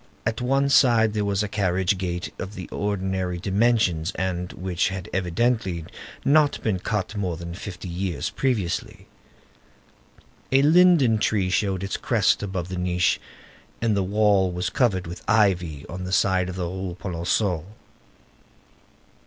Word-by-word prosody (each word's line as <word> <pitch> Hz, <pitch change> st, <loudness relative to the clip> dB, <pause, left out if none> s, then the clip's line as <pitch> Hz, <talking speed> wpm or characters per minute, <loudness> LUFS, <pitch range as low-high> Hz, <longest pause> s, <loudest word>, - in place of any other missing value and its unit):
At 110 Hz, +3 st, -1 dB
one 135 Hz, +3 st, +2 dB
side 115 Hz, -5 st, +4 dB
there 105 Hz, -1 st, 0 dB
was 100 Hz, 0 st, 0 dB
a -, -, -2 dB
carriage 95 Hz, -1 st, +1 dB
gate 90 Hz, -1 st, -3 dB
of 100 Hz, +3 st, -6 dB
the 90 Hz, -, -7 dB
ordinary 95 Hz, -3 st, -2 dB
dimensions, 95 Hz, -4 st, +1 dB
and 90 Hz, -1 st, -2 dB
which 90 Hz, -1 st, -1 dB
had 95 Hz, -2 st, -6 dB
evidently 95 Hz, -1 st, 0 dB, 0.4 s
not 145 Hz, 0 st, +4 dB
been 100 Hz, -5 st, 0 dB
cut 105 Hz, +1 st, -3 dB
more 90 Hz, -5 st, -2 dB
than 85 Hz, 0 st, -7 dB
fifty 95 Hz, 0 st, -7 dB
years 85 Hz, -4 st, -3 dB
previously. 110 Hz, -11 st, -2 dB, 1.5 s
A 135 Hz, +1 st, +4 dB
linden 155 Hz, -8 st, +5 dB
tree 100 Hz, -4 st, +1 dB
showed 95 Hz, -2 st, 0 dB
its 95 Hz, -, -2 dB
crest -, -, +2 dB
above 95 Hz, -4 st, -3 dB
the 90 Hz, -1 st, -4 dB
niche, 90 Hz, 0 st, +1 dB, 0.6 s
and 115 Hz, -3 st, +1 dB
the 100 Hz, -, +1 dB
wall 100 Hz, -1 st, +2 dB
was 90 Hz, +1 st, -2 dB
covered 100 Hz, -8 st, +1 dB
with 85 Hz, +2 st, -8 dB
ivy 90 Hz, -9 st, +2 dB
on 90 Hz, +1 st, -6 dB
the 90 Hz, -, -5 dB
side 95 Hz, -1 st, +2 dB
of 90 Hz, -, -5 dB
the 90 Hz, -1 st, -2 dB
Rue 95 Hz, 0 st, -5 dB
Polonceau. 90 Hz, -1 st, -1 dB
95 Hz, 145 wpm, -24 LUFS, 90-110 Hz, 1.5 s, linden